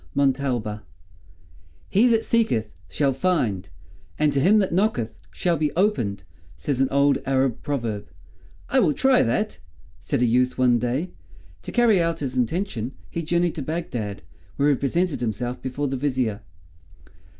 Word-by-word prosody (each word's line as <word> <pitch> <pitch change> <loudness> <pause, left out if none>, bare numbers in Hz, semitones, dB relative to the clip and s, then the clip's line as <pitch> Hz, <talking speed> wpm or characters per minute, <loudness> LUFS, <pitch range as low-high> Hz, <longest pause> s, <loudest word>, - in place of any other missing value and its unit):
MONTALBA 130 -6 0 1.1
"He 220 +6 +4
that 225 -2 +3
seeketh, 125 - +1 0.2
shall 140 - +1
find, 130 - 0 0.5
and 150 -1 +2
to 140 - +2
him 195 +10 +5
that 195 -5 +1
knocketh 170 - +1 0.2
shall 175 -2 0
be 150 -1 0
opened," 165 - 0 0.3
says 130 - -1
an 135 - +4
old 140 +1 +3
Arab 135 -2 0
proverb. 115 -8 -3 0.6
"I 265 - +3
will 170 -11 +3
try 265 -1 +4
that," 130 - 0 0.4
said 105 +8 -1
a - - +5
youth 125 +2 +2
one 125 -2 +4
day. 130 +9 -2 0.5
To - - -7
carry 225 -6 +4
out 165 0 0
his 130 -3 -3
intention 130 - -1 0.2
he 170 - -2
journeyed 170 +1 +1
to 155 - -5
Bagdad, 125 - -4 0.3
where 145 +1 +2
he - - +3
presented 165 +5 -1
himself 120 +2 -3
before 135 +3 -2
the 135 0 -2
Vizier. 125 -6 -1
140 Hz, 150 wpm, -24 LUFS, 120-170 Hz, 1.1 s, him